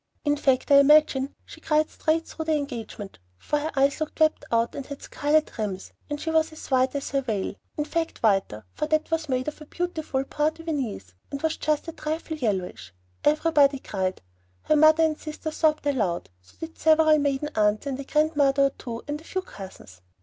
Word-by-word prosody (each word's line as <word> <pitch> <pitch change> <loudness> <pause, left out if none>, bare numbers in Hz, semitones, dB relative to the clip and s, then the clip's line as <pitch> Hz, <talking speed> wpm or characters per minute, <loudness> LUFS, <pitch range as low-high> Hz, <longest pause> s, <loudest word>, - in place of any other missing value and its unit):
In 290 0 +3
fact, 270 -1 +1
I 280 - +9
imagine 280 -2 +4
she - - -13
cried 305 0 +1
straight 325 +1 0
through 320 - -6
the 315 -1 +2
engagement, 235 - -6 0.2
for 295 - -1
her 310 +2 -3
eyes 275 +2 +2
looked 310 0 -4
wept 310 -1 +3
out 230 0 +1
and 280 - -5
had 280 +1 -9
scarlet 305 +1 0
rims, 195 -3 -4 0.2
and 295 0 -3
she 320 - -3
was 320 0 +2
as 315 -2 -11
white 260 +1 +2
as 280 - -3
her 275 0 +1
veil. 220 -7 -2 0.2
In 300 - -1
fact, 330 -3 -3
whiter, 195 - +1
for 305 - -2
that 310 +1 0
was 320 -2 -1
made 255 +1 -1
of 300 +1 -5
beautiful 315 -6 -2
point 300 +3 -1
de 330 - -12
Venise, 255 - -4 0.2
and 280 - -4
was 320 0 0
just 305 +1 -1
a - - -3
trifle 315 0 -4
yellowish. 185 - -3 0.3
Everybody 295 -2 +4
cried. 190 - -3 0.4
Her 310 - +2
mother 310 +1 +6
and 310 -1 +1
sister 310 0 -6
sobbed 310 -1 +1
aloud, 205 - -1
so 90 - -23
did 325 0 -8
several 315 -1 +5
maiden 285 +1 -1
aunts 210 +2 +2
and 275 -1 -3
a - - -4
grandmother 290 -2 +2
or 275 - +4
two 235 -3 -7
and 295 +1 -4
a - - -16
few 375 +2 -3
cousins. 185 - -12
290 Hz, 200 wpm, -25 LUFS, 255-310 Hz, 0.4 s, I